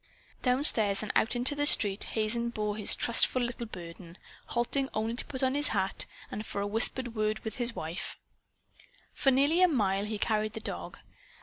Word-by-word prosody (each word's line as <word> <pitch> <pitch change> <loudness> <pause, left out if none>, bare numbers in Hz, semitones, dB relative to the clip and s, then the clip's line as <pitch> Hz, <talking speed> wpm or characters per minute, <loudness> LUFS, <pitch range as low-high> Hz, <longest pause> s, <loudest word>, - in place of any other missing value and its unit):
Downstairs 235 -6 +3
and 210 - -3
out 225 - +2
into 245 +4 +4
the 290 0 +2
street 205 -7 +5
Hazen 235 +2 -2
bore 210 -3 -4
his 210 -1 +3
trustful 240 +2 +2
little 240 -1 -5
burden, 170 -2 -11 0.3
halting 265 +3 -1
only 220 +1 -2
to - - -2
put 270 -2 -6
on 260 0 +1
his 290 +1 0
hat, - - 0 0.2
and 215 - -5
for 205 - -6
a 200 - -2
whispered 225 +3 +3
word 215 -1 -1
with 220 - -6
his 240 -1 +1
wife. 170 +3 -6 1.0
For 275 - +1
nearly 285 +7 +2
a 365 - +6
mile 205 - -1
he 215 0 -4
carried 215 0 -2
the 220 - -6
dog. - - -5
225 Hz, 185 wpm, -28 LUFS, 210-255 Hz, 1.0 s, a